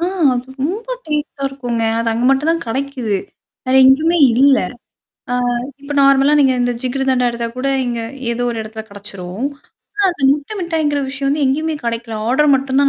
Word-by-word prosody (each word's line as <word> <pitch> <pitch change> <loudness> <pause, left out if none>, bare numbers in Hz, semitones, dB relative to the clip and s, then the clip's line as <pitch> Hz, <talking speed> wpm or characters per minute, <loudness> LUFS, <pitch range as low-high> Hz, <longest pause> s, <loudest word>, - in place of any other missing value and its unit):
ஆ! 340 - +1 0.3
அது 245 +1 -3 0.2
ரொம்ப 380 +11 -2 0.2
டேஸ்டா 300 -2 -3
இருக்குங்க. 245 -4 -3 0.2
அது 230 0 0
அங்க 230 +2 -1
மட்டும் 275 +4 +2
தான் 335 - -3
கிடைக்குது 255 -3 -2 0.5
வேற 255 - +1
எங்கயுமே 315 +6 +4 0.2
இல்ல. 270 +2 +5 0.7
ஆ - - +1 0.5
இப்ப 285 +1 -6
நார்மலா 275 +1 +5
நீங்க 265 -2 +4
இந்த 245 0 +1
ஜிக்ருதண்டா 260 -1 +1
எடுத்தா 235 0 -3
கூட, 260 +2 -1 0.2
இங்க 240 -1 -2 0.3
ஏதோ 240 +1 -2
ஒரு 230 - -5
எடத்துல 220 0 -7
கிடைச்சரும். 200 0 -7 0.6
ஆ - - +2
அது 340 -5 -8
முட்டை 290 +8 -4
மிட்டாய்ங்கிற 315 -4 0
விஷயம் 275 0 -3
வந்து 290 +1 +1
எங்கயுமே 310 +4 0
கிடைக்கல. 230 -1 -3
ஆர்டர் 290 +4 +3
மட்டும் 265 0 0
தான் 280 - +4
270 Hz, 170 wpm, -17 LUFS, 240-290 Hz, 0.7 s, இல்ல